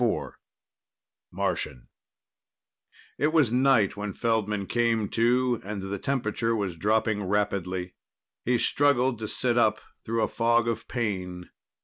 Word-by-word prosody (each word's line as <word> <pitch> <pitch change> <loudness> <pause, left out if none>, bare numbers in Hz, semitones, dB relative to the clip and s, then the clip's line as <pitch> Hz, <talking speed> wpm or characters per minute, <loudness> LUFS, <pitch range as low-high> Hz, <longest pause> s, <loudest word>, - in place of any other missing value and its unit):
IV 115 - 0 1.0
Martian 60 - -3 1.3
It 145 - +3
was 155 -8 +3
night 125 -5 +3
when 105 -1 -4
Feldman 105 -3 0
came 115 -1 +1
to, 120 +1 +2
and 100 0 -5
the 95 0 -4
temperature 115 -3 -1
was 100 -5 -2
dropping 105 +3 +1
rapidly. 95 -2 -1 0.5
He 125 0 +2
struggled 130 -2 +2
to 110 - -3
sit 120 +2 +1
up 110 -2 +3 0.2
through 115 0 0
a - - +2
fog 115 0 +2
of 115 - -2
pain. 90 -7 -3
110 Hz, 125 wpm, -27 LUFS, 100-120 Hz, 1.3 s, It